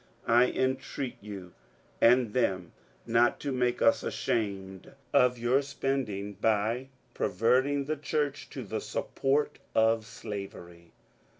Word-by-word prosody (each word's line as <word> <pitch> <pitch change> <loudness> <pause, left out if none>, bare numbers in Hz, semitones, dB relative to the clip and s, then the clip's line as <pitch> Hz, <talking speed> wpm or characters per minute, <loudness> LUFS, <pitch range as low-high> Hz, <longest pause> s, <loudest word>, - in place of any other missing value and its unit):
I 120 +2 +5
entreat 130 0 -2
you 100 -4 -9 0.5
and 120 -2 +5
them 95 -8 0 0.3
not 120 +1 +3
to 140 - -2
make 125 -1 0
us 115 - +4
ashamed 95 -4 -3 0.2
of 125 -1 +3
our 130 +3 +4
spending, 135 -8 -2
by 110 +5 0 0.3
perverting 130 +8 +2
the 155 +2 -2
church 145 -1 -2
to - - -6
the - - -4
support 140 +2 -1 0.2
of 110 0 +3
slavery. 85 -6 -8
115 Hz, 115 wpm, -29 LUFS, 100-130 Hz, 0.5 s, I